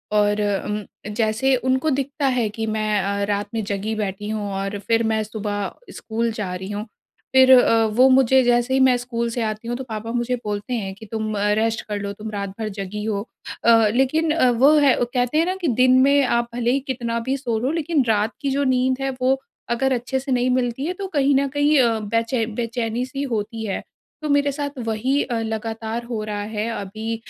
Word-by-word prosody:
और 210 0 +3 0.2
उम, 210 0 -3 0.3
जैसे 225 +4 +2
उनको 260 +4 0
दिखता 280 +1 -1
है 225 - +1
कि 225 +1 -4
मैं 215 -1 0
अ, 200 +1 -1
रात 205 0 -1
में 225 - -1
जगी 200 +2 -3
बैठी 205 0 -3
हूँ 210 -2 -3
और 195 +1 -3
फिर 230 0 +3
मैं 220 -1 +1
सुबह 205 -2 -4 0.2
स्कूल 230 +1 -2
जा 200 -4 -4
रही 190 +1 -6
हूँ। 205 +1 -4 0.5
फिर 260 0 +7
अ, 230 -3 +6
वो 230 +4 +4
मुझे 265 0 +5
जैसे 240 +1 +2
ही 265 - +3
मैं 260 -1 +5
स्कूल 235 -1 -3
से 235 +1 -3
आती 215 +1 -4
हूँ, 240 - -2
तो 265 - -5
पापा 225 -1 -5
मुझे 245 +1 0
बोलते 210 +3 -3
हैं 195 -5 -3
कि, 220 - -12
"तुम 215 0 -3
अ, 205 - +1
रेस्ट 225 0 0
कर 205 -1 -3
लो, 200 0 -3
तुम 215 +2 -7
रात 200 -1 -3
भर 220 - -2
जगी 200 +2 -4
हो।" 210 0 -2 0.4
अ, 225 -2 +6
लेकिन 305 +5 +2
अ, 280 -6 +3
वो 260 +5 +5
है 280 -3 +5
कहते 245 +3 0
हैं 330 - +4
ना 370 +1 -1
कि 335 - 0
दिन 255 0 +6
में 280 +1 +4
आप 235 -2 +1
भले 240 0 +1
ही 275 - +2
कितना 235 -3 -2
भी 270 - +1
सो 240 -4 -2
लो, 260 +5 0
लेकिन 325 -3 +1
रात 215 +1 +1
की 280 - -1
जो 280 +1 +1
नींद 260 -1 +2
है 270 - 0
वो 265 +1 +2 0.3
अगर 260 +3 +1
अच्छे 250 +2 -1
से 270 0 -5
नहीं 250 0 +2
मिलती 250 +2 -1
है 360 - -1
तो 390 +1 -5
कहीं 275 0 +3
न 275 +1 +2
कहीं 290 +1 +2
अ, 230 -3 +3
बेचै 230 +2 0
बेचैनी 230 +1 -2
सी 275 +2 -5
होती 220 +1 -3
है। 195 - -2 0.4
तो 305 - -3
मेरे 285 0 +3
साथ 285 -1 -5
वही 255 +6 +1
अ, 235 -3 -2
लगातार 225 +1 -4
हो 230 -3 -4
रहा 210 -1 -3
है 215 +2 -1
अभी 220 +3 -4
230 Hz, 220 wpm, -22 LUFS, 215-260 Hz, 0.5 s, फिर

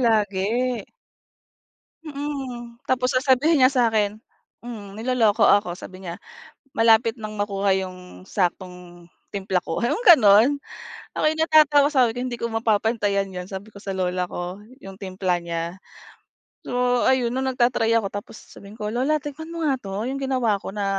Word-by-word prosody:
lagi. 210 -5 +2 1.6
Mm, 270 -6 -6
tapos 255 0 +1
sasabihin 265 +3 +3
niya 255 - +7
sakin 220 -5 +1 0.5
mm, 210 -4 -8
niloloko 225 -3 +2
ako 200 -4 +3
sabi 185 +1 -11
niya, 175 0 -6 0.6
"Malapit 225 0 +4
nang 215 0 -6
makuha 200 -1 +1
yung 185 -1 -8
saktong 180 -2 -4 0.2
timpla 190 -2 -1
ko," 165 - -4
yung 410 - 0
gano'n 255 - +6 0.5
ako - - -2
yung 315 +1 -2
natatawa 295 -3 +5
sabi 245 -4 +3
ko - - -4
"Hindi 240 -2 -4
ko - - -1
mapapantayan 220 -3 0
yun," 180 -1 -6
sabi 195 +2 -7
ko 210 - -19
sa 195 - -4
lola 180 -1 -1
ko 180 +3 -6 0.2
yung 195 0 -10
timpla 185 -2 -2
niya. 170 +1 -4 0.9
So 245 0 +1
ayun 250 -2 +2
'no 260 - -1
nag-ta-try 245 -3 +1
ako 215 - -1
tapos 205 +2 -7
sabihin 200 +2 -14
ko 210 - -3
"Lola 270 +6 +1
tikman 295 +3 -8
mo 335 -1 -3
nga 275 -3 +2
'to 200 +3 -4
yung 275 +1 -4
ginawa 250 -7 0
ko - - -6
na 205 0 -3
220 Hz, 155 wpm, -23 LUFS, 195-255 Hz, 1.6 s, niya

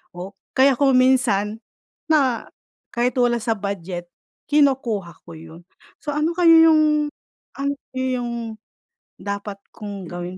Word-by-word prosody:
O 185 +3 -7 0.3
kaya 270 +1 +6
kung 270 -2 +3
minsan, 225 -5 +2 0.5
na 270 -7 +2 0.5
kahit 245 +2 0
wala 245 -1 +3
sa 225 +1 -1
budget, 185 -3 -5 0.4
kinukuha 245 - +1
ko - - -10
yun. 165 +1 -13 0.4
So, 295 - -5
ano 310 +3 +1
kaya 330 -2 +7
yung 300 -1 +3 0.5
ang 280 +1 0 0.2
iyong 240 -3 -3 0.6
dapat 200 0 -5 0.2
kong 200 -3 -7
gawin 175 +1 -6
235 Hz, 120 wpm, -21 LUFS, 200-275 Hz, 0.6 s, kaya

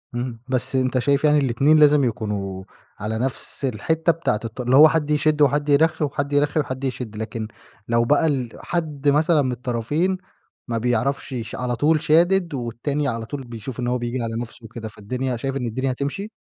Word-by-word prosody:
اهم، 120 -1 -4
بس 130 +1 0
أنت 130 0 +1
شايف 140 +3 +1
يعني 150 -1 +5
الاتنين 140 +3 +3
لازم 150 -1 +6
يكونوا 105 -5 -3 0.4
على 110 +2 -3
نفس 130 +2 -3
الحتة 160 +8 +1
بتاعة 165 -10 -1
الط 115 +3 -5
اللي 125 +1 +2
هو 155 +3 +10
حد 150 -2 0
يشد 150 0 +2
وحد 145 +1 +3
يرخي، 155 +2 +3
وحد 140 0 -3
يرخي 145 +2 +2
وحد 130 -2 -3
يشد، 125 -4 -4
لكن 110 0 -4 0.4
لو 115 0 +2
بقى 145 +5 +3
ال 130 -5 -1
حد 150 -5 -1
مثلًا 155 +2 +3
من 130 -2 0
الطرفين 125 +9 -1 0.5
ما 115 -2 -1
بيعرفش 125 +4 -1
ش 110 - -7
على 125 -1 -2
طول 150 +4 +2
شادد 170 +2 +3
والتاني 135 +4 -2
على 115 -3 -3
طول 135 +3 -6
بيشوف 120 +1 -8
إن 120 - -1
هو 125 - +1
بيجي 120 +1 -3
على 115 -1 -3
نفسه 120 0 -9
وكده، 115 0 -7
فالدنيا 125 +4 -4
شايف 135 +3 -3
إن 130 -3 -2
الدنيا 130 +4 -2
هاتمشي؟ 140 +11 -3
130 Hz, 190 wpm, -22 LUFS, 120-150 Hz, 0.5 s, هو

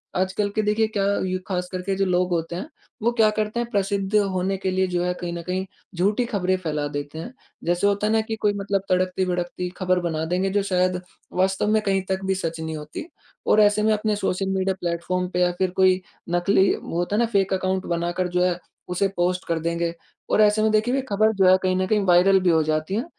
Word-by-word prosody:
आजकल 190 +3 0
के 215 - +2
देखिए 215 +1 +1
क्या 210 -3 -1 0.2
यु 185 0 -1
ख़ासकर 180 -1 -3
के 195 +1 -2
जो 195 0 +1
लोग 180 0 +1
होते 170 0 -1
हैं, 185 - -4 0.4
वो 235 - +3
क्या 225 -2 +4
करते 215 +2 -2
हैं? 240 0 -2
प्रसिद्ध 200 0 0
होने 195 -2 +1
के 190 0 -2
लिए 185 0 +1
जो 175 -1 -1
है, 180 0 0
कहीं 175 -1 -5
न 170 - -5
कहीं 185 +1 -1 0.3
झूठी 205 +7 +1
खबरें 185 -5 0
फैला 150 -4 -2
देते 145 +2 -5
हैं। 240 +10 -7 0.3
जैसे 175 +4 +1
होता 205 +1 +1
है 220 - +1
ना, 220 - +3
कि 220 0 -4
कोई 210 -1 +1
मतलब 200 -1 -1
तड़कती-भड़कती 180 -1 -1
ख़बर 185 -1 +1
बना 160 -2 -2
देंगे 180 +3 0
जो 200 +1 +1
शायद 185 -1 +1 0.4
वास्तव 190 +2 +1
में 215 0 +3
कहीं 195 -2 +1
तक 190 0 -1
भी 190 0 +1
सच 165 -3 -3
नहीं 160 0 -4
होती। 150 - -7 0.4
और 215 - +5
ऐसे 210 +1 +4
में 220 - +3
अपने 210 0 0
सोशल 195 -1 -1
मीडिया 190 0 0
प्लेटफ़ॉर्म 175 +1 -2
पे 180 - 0
या 180 0 +3
फिर 185 -1 +1
कोई 185 0 +4 0.3
नकली 185 +3 +3
वो 170 - -6
होता 175 +4 0
ना 235 - +3
फेक 195 -1 +2
अकाउंट 190 0 -1
बनाकर 175 +1 -1
जो 180 - +3
है, 180 -1 +1 0.3
उसे 180 +2 +1
पोस्ट 180 +1 0
कर 165 -1 0
देंगे। 170 +1 -1 0.4
और - - +3
ऐसे 210 0 +4
में 215 0 +3
देखिए, 220 +4 +2
वे 270 - +1
खबर 215 +2 +3
जो 190 -1 +4
है 185 - +7
कहीं 185 0 +2
न 185 0 +1
कहीं 210 0 +2
वायरल 185 +2 +5
भी 180 - +2
हो 160 -1 +4
जाती 155 +4 -1
हैं, 235 - -1
185 Hz, 235 wpm, -23 LUFS, 180-205 Hz, 0.4 s, है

